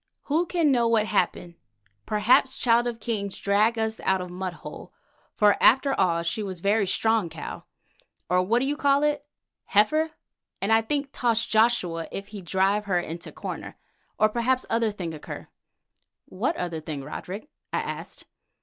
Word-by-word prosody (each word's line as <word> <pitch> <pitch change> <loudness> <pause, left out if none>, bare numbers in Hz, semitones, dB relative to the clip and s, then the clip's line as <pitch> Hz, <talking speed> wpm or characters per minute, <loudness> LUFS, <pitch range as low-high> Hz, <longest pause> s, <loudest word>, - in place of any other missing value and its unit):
"Who 325 +4 +1
can 330 -5 +2
know 240 -3 +3
what 225 -2 +3
happen? 175 -4 -1 0.5
Perhaps 240 +5 +3
Child 240 -1 +3
of 235 -1 -4
King 215 -3 -2
drag 205 +4 +1
us 220 0 -1
out 190 0 +1
of 180 -1 -6
mud 185 0 -4
hole, - - -9 0.4
for 210 -2 +4
after 270 +3 +5
all 170 -6 +1
she 170 +6 -1
was 190 -4 -5
very 200 +2 +2
strong 220 -1 +1
cow, 160 -1 -7 0.6
or 180 +1 +3
what 230 +7 +2
you 285 +2 0
call 285 -1 +3
it, 295 -1 0 0.4
heifer, 310 +11 +3 0.5
and 205 +3 +1
I 225 - +5
think 280 +4 -2
toss 230 -2 +1
Joshua 215 -7 +2
if 200 0 -6
he 205 -2 -8
drive 195 +3 +1
her 185 -3 +1
into 170 0 -6
corner. - - -7 0.4
Or 215 - +5
perhaps 240 +4 0
other 230 -1 +2
thing 180 -6 -5
occur." 155 - -8 0.8
"What 255 - -2
other 170 -2 -3
thing, 150 -3 -6
Roderick?" 200 - -7 0.2
I - - 0
asked. - - -6
215 Hz, 165 wpm, -26 LUFS, 185-240 Hz, 0.8 s, after